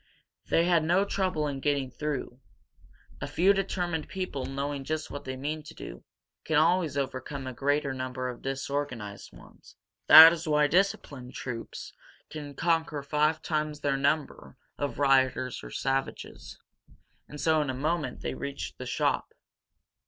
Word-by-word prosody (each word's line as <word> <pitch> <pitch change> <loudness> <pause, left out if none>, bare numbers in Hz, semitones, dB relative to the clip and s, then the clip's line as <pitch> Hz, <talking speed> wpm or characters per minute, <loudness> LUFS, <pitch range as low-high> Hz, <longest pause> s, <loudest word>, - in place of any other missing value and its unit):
They 165 - +3
had 170 -2 +3
no 175 +5 +3
trouble 185 -6 -1
in 140 -2 -3
getting 140 -2 0
through. 140 -3 -4 0.8
A - - -3
few 190 +4 +4
determined 180 -5 -2
people, 180 -9 -4
knowing 140 +1 -3
just 155 +2 -3
what 145 0 -7
they 130 0 -4
mean 150 +4 -3
to 150 - -12
do, - - -9 0.4
can 160 - +1
always 165 -2 +3
overcome 135 0 -4
a 130 - -5
greater 140 +1 0
number 130 0 -4
of 125 -1 -6
disorganized 135 -6 -4
ones. - - -17 0.3
That 160 +1 +12
is 165 0 -5
why 150 -1 +4
disciplined 145 -7 0
troops 115 -3 -6 0.4
can 145 -2 -7
conquer 165 -3 0
five 150 +2 +1
times 155 -1 -2
their 140 -1 +1
number 140 -1 -1 0.2
of 145 -1 -3
rioters 130 -2 +2
or - - -8
savages. 135 0 -3 0.7
And 150 - -9
so 160 0 +3
in 145 - -2
a 130 - -2
moment 150 -1 -2
they - - -3
reached 140 0 -6
the 130 - -6
shop. 120 - -1
145 Hz, 150 wpm, -28 LUFS, 135-160 Hz, 0.8 s, That